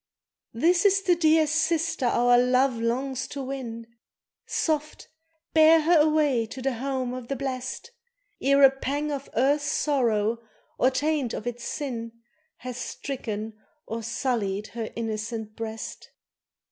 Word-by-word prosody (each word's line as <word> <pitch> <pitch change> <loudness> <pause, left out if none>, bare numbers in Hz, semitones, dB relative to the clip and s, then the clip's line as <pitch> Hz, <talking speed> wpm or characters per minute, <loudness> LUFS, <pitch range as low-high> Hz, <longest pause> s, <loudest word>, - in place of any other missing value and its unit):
"This 340 +8 +3
is 395 -1 +4
the 360 - +4
dear 320 -1 +4
sister 320 -2 +1
our 245 +1 +4
love 250 0 +3
longs 260 +3 -1
to 275 - -6
win, 250 -4 -6 0.6
Soft! 305 -1 -2 0.5
bear 320 0 +7
her 330 +1 +4
away 295 -6 +3
to 260 - -8
the 265 +1 -1
home 255 0 -2
of 250 -2 -7
the 275 - -2
blest, 265 - -5 0.5
Ere 275 +1 +4
a 270 - +9
pang 285 +3 -3
of 280 -1 -5
earth's 285 +5 +2
sorrow, 230 -6 +1 0.4
or 255 - +5
taint 280 -1 -1
of - - -6
its 240 0 -5
sin, 235 -6 -4 0.4
Hath 250 -1 -7
stricken 225 -5 -5 0.3
or 230 +1 -4
sullied 220 -3 -2
her 230 -2 -5
innocent 220 -1 -4
breast." 225 0 -6
260 Hz, 135 wpm, -26 LUFS, 230-295 Hz, 0.6 s, a